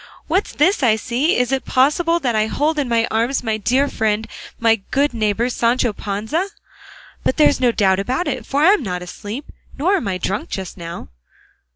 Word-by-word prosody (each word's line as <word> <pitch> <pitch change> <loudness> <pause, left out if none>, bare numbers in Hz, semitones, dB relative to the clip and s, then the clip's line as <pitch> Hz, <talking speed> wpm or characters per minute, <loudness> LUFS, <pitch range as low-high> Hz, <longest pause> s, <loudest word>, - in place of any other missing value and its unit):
What's 370 +6 0
this 360 +6 +2
I 235 -5 +4
see? 255 - 0
Is 250 +1 +1
it 270 -1 0
possible 315 +6 +2
that 245 -4 0
I 215 0 +2
hold 300 +6 0
in 275 -4 -1
my 230 -1 +2
arms 235 +4 0
my 220 -2 -1
dear 255 +7 +1
friend, 220 -3 -1 0.3
my 225 -1 +4
good 280 0 +1
neighbour 220 +1 0
Sancho 240 -1 +1
Panza? 220 - -2 0.8
But - - 0
there's 300 -3 +4
no 250 -2 +3
doubt 190 -4 +2
about 255 - -1
it, - - -2
for 285 +2 0
I'm 385 +1 +5
not 180 -6 -4
asleep, 210 +9 -7 0.3
nor 370 +8 +2
am 330 - -4
I 185 -2 -1
drunk 195 +3 -3
just 190 -3 -5
now." 170 -1 -8
240 Hz, 190 wpm, -19 LUFS, 215-285 Hz, 0.8 s, I'm